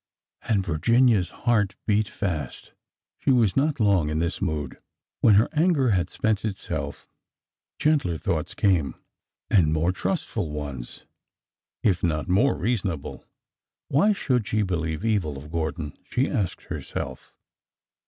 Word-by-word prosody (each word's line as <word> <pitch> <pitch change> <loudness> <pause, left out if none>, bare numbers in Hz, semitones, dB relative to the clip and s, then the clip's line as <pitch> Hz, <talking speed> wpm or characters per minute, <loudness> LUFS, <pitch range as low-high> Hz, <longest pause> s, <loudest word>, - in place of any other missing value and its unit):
And 100 -4 0
Virginia's 105 +4 +3
heart 105 -5 +1
beat 105 0 +2
fast. 80 - -4 0.5
She - - -1
was 120 -7 +4
not 140 +1 +1
long 100 -8 +3
in 75 - -1
this 85 +3 -1
mood. 75 -7 -2 0.4
When 110 - +6
her 110 +4 +5
anger 155 -6 +3
had 90 -3 +1
spent 110 -1 0
itself 105 -3 -4 0.7
gentler 140 - +2
thoughts - - -2
came, 90 -8 +2 0.6
and 85 -7 +4
more 80 +3 +2
trustful 85 -3 -2
ones, 70 -5 -6 0.8
if 95 -5 +2
not 80 -3 0
more 105 +10 +3
reasonable. 95 - -2 0.6
Why 165 +10 +4
should 125 - 0
she 110 -1 +1
believe 80 -1 -2
evil 95 -11 0
of 75 +3 -10
Gordon, 80 -2 -3
she 130 +3 +1
asked 105 - -2
herself. 65 - -6
95 Hz, 130 wpm, -25 LUFS, 80-115 Hz, 0.8 s, When